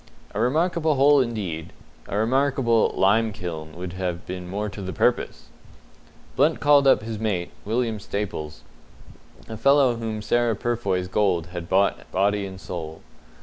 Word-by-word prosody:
A 105 - -3
remarkable 155 +5 +1
hole 140 +1 +5
indeed; 95 -10 -4 0.3
a 100 - -3
remarkable 125 0 +2
"lime 110 +3 +3
kiln" 80 -5 -6
would 90 -1 -6
have 90 -2 -4
been 90 -1 -6
more 105 +3 -2
to 100 0 -7
the 95 -1 -5
purpose! - - 0 0.9
Blunt 150 +5 +3
called 145 -1 +5
up 135 - +5
his 110 -1 -5
mate, 100 -6 -2
William 115 0 -1
Staples, 80 -9 -5 0.9
a 110 - -7
fellow 140 0 +4
whom 110 -2 -4
Sarah 120 +1 +1
Purfoy's 100 -6 -1
gold 90 -4 0
had 85 -2 -6
bought 100 +1 +1
body 100 +1 +1
and 95 -1 -9
soul. 80 -4 -7
105 Hz, 145 wpm, -24 LUFS, 90-120 Hz, 0.9 s, hole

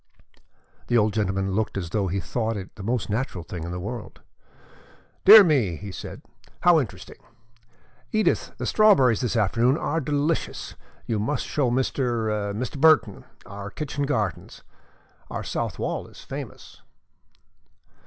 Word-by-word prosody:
The 120 - +3
old 105 -2 +2
gentleman 95 -2 -1
looked 105 +1 -1
as 85 -3 -4
though 100 -1 0
he 95 +2 -1
thought 115 +2 -2
it 95 -1 -8
the 110 - -11
most 115 +3 -1
natural 105 -5 -3
thing 85 0 -7
in - - -5
the 90 - -4
world. 115 +5 -7 1.1
"Dear 210 +1 +11
me," 130 - +2
he 100 +5 -8
said, - - -8 0.4
"how 175 -2 +6
interesting! 95 -9 -6 0.9
Edith, 215 0 +1
the - - -4
strawberries 165 - +4
this 125 -1 -1
afternoon 115 +5 +2
are 165 0 -1
delicious. 150 +3 -2 0.3
You 110 -2 -1
must 115 +8 -1
show 140 -4 0
Mr. 120 -5 -1
Mr. 125 +6 -5
Burton 155 -10 +4 0.2
our 100 0 -8
kitchen 145 +3 -4
gardens. 105 - -3 0.7
Our - - -4
south - - -3
wall - - -3
is - - -14
famous." - - -9
115 Hz, 145 wpm, -24 LUFS, 100-140 Hz, 1.1 s, Dear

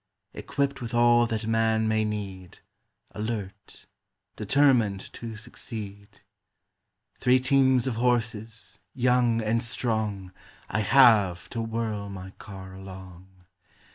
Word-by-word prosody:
Equipped 140 -1 -2
with 120 0 -4
all 120 0 +5
that 110 -1 -3
man 110 0 +2
may 110 0 +2
need, 100 -4 -5 0.5
Alert, 105 -3 -6 0.5
determined 120 -9 +2
to 115 -1 -7
succeed. 105 -2 -9 1.0
Three 125 +1 +4
teams 130 -1 +3
of 125 -4 -2
horses, 115 -2 -1 0.2
young 125 -2 +2
and 115 +2 +1
strong, 110 -5 -2 0.4
I - - 0
have, 110 -7 +5
to 115 - -3
whirl 110 -3 -3
my 95 -1 -8
car 95 -2 -10
along. 95 -1 -12
110 Hz, 110 wpm, -26 LUFS, 100-120 Hz, 1.0 s, all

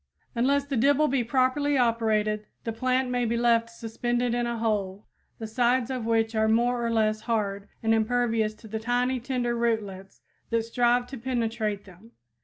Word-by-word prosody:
Unless 275 +4 +1
the 280 -2 -2
dibble 285 +5 +3
be 265 -2 +1
properly 265 +4 +1
operated 215 -3 +1 0.2
the 225 - -3
plant 255 +2 0
may 245 0 0
be 235 0 0
left 230 -1 +2
suspended 240 +1 -2
in 240 0 0
a 235 0 -2
hole, 205 -3 -2 0.3
the 225 - -6
sides 245 +2 +1
of 250 -3 -3
which 225 0 +1
are 220 0 +2
more 240 +2 +2
or 235 - 0
less 215 -1 +1
hard 205 -3 -2 0.2
and 225 0 +3
impervious 225 -1 +1
to 220 - -14
the 220 +1 -4
tiny, 245 +3 0
tender 245 -1 -2
rootlets 210 -5 -3 0.3
that 230 -1 +1
strive 245 +1 +2
to 265 0 -9
penetrate 225 -4 -2
them. 195 +5 -17
235 Hz, 175 wpm, -26 LUFS, 220-245 Hz, 0.3 s, dibble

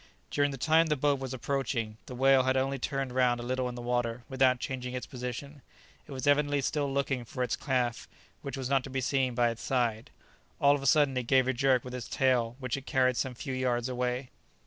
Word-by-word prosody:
During 145 0 +2
the 135 - -5
time 160 +5 +3
the 150 - +1
boat 145 0 +1
was 135 -1 -5
approaching, 125 -4 -2
the 125 - -7
whale 135 +1 +5
had 130 +1 +1
only 135 +1 0
turned 135 0 -2
round 125 -2 +2
a - - -5
little 130 +1 -1
in 120 - -7
the 120 - -7
water 120 -1 -1
without 130 -2 +3
changing 125 -1 -4
its 125 - -4
position. 130 +2 -6 0.5
It - - -12
was 130 -2 -4
evidently 145 0 +3
still 140 +1 -1
looking 135 -2 -1
for 125 +2 -4
its 115 -4 -1
calf, 125 -1 -1 0.3
which 140 - -5
was 130 -2 -3
not 135 -1 +2
to - - -7
be 135 0 -2
seen 130 -1 0
by 120 -1 +3
its 115 - -8
side. 120 -4 -1 0.5
All 140 0 +5
of 145 - -1
a 135 - -2
sudden 145 -1 +4
it 125 -2 -2
gave 130 -1 +4
a 130 - +2
jerk 130 -1 +2
with 125 - -8
its 125 -3 -5
tail 125 -3 +1
which 130 0 -3
carried 130 -3 +3
it 125 - -8
some 130 -2 -2
few 135 +2 -5
yards 125 -2 0
away. 125 +1 -2
130 Hz, 235 wpm, -30 LUFS, 125-135 Hz, 0.5 s, whale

